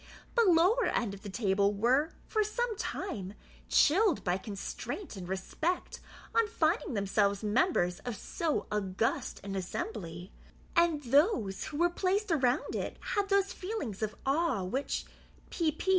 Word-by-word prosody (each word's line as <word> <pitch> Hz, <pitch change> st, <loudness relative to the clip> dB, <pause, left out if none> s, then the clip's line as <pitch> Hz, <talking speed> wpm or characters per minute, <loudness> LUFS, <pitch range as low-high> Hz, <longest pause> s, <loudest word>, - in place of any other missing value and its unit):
The 470 Hz, -1 st, +4 dB
lower 360 Hz, +9 st, +4 dB
end 215 Hz, -5 st, 0 dB
of 200 Hz, -, -9 dB
the 205 Hz, -, -7 dB
table 200 Hz, -1 st, +2 dB
were, 255 Hz, +9 st, +3 dB, 0.2 s
for 435 Hz, -1 st, +1 dB
some 455 Hz, +2 st, -1 dB
time, 210 Hz, -, -4 dB, 0.3 s
chilled 360 Hz, +2 st, +4 dB
by 180 Hz, +1 st, +1 dB
constraint 210 Hz, -, -5 dB
and 180 Hz, -2 st, -7 dB
respect 310 Hz, -, -2 dB, 0.3 s
on 460 Hz, -1 st, +3 dB
finding 335 Hz, -, 0 dB
themselves 200 Hz, 0 st, +1 dB
members 210 Hz, -, +2 dB
of 245 Hz, -2 st, -5 dB
so 315 Hz, -, -2 dB
august 210 Hz, +1 st, -1 dB
an 195 Hz, 0 st, -4 dB
assembly; 180 Hz, -2 st, -5 dB, 0.4 s
and 335 Hz, -4 st, +3 dB
those 250 Hz, -, +2 dB
who 295 Hz, -, -6 dB
were 345 Hz, +2 st, +3 dB
placed 385 Hz, +3 st, 0 dB
around 260 Hz, -3 st, +2 dB
it -, -, -3 dB
had 400 Hz, -1 st, -1 dB
those 395 Hz, -1 st, +2 dB
feelings 365 Hz, -, -4 dB
of 215 Hz, -1 st, -2 dB
awe 275 Hz, -, +1 dB
with 180 Hz, -, -5 dB
which -, -, -2 dB, 0.5 s
P. 315 Hz, -3 st, 0 dB
265 Hz, 145 wpm, -31 LUFS, -, 0.5 s, The